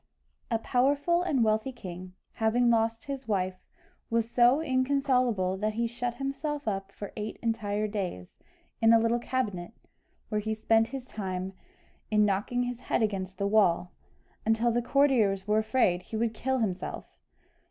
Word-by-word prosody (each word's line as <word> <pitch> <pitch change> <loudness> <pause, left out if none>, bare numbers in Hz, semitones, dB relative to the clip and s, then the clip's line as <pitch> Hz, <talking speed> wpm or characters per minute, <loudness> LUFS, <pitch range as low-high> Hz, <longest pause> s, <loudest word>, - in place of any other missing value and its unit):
A 230 - +2
powerful 285 +9 +2
and 285 -9 +1
wealthy 220 +4 +1
king, 185 -6 -9 0.2
having 235 +2 +2
lost 225 0 +1
his 275 -2 -6
wife, 185 -3 -1 0.5
was 230 0 +1
so 240 +3 +4
inconsolable, 255 -8 +1
that 215 +2 -1
he 235 +1 0
shut 240 +1 -3
himself 285 +1 -3
up 195 -1 -2
for 205 0 -8
eight 215 0 -5
entire 215 -2 -1
days, 185 - -5 0.4
in 225 0 +6
a 230 - +7
little 230 +1 +2
cabinet, 225 -7 -3 0.6
where 210 -1 0
he 220 +1 -2
spent 225 +1 +3
his 265 0 -6
time 190 -4 -4 0.6
in 210 -1 +4
knocking 210 +5 0
his 245 -1 -4
head 230 - 0
against 195 -3 -2
the 200 - -1
wall, 200 -4 +3 0.5
until 225 +2 +2
the 240 +1 +1
courtiers 235 -7 +2
were 210 +1 +3
afraid 220 -5 +2
he 220 - -6
would 230 0 0
kill 265 +4 -1
himself! 195 -6 -3
225 Hz, 155 wpm, -29 LUFS, 205-245 Hz, 0.6 s, a